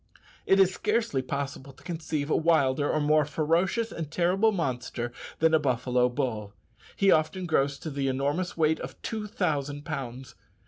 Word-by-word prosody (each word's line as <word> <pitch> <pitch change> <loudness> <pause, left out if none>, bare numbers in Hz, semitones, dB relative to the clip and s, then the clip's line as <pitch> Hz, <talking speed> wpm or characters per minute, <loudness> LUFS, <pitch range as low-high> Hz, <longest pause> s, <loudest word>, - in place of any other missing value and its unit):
It 195 - +5
is 190 -1 +5
scarcely 210 - 0
possible 140 0 -5
to - - -20
conceive 160 -3 -3
a - - +4
wilder 145 -4 +2
or 155 - +1
more 150 +1 +4
ferocious 170 +10 0
and 160 -3 -5
terrible 180 +7 +2
monster 125 - -3 0.2
than 160 0 +3
a 160 - +6
buffalo 125 -2 +1
bull. 110 -5 -3 0.4
He 195 -1 +4
often 170 +4 +1
grows 140 -4 +1
to 155 - -6
the 140 -1 -1
enormous 145 +8 -1
weight 160 -1 +2
of - - -8
two 215 -2 -3
thousand 145 -8 -2
pounds. 130 -4 -6
150 Hz, 165 wpm, -28 LUFS, 135-175 Hz, 0.4 s, a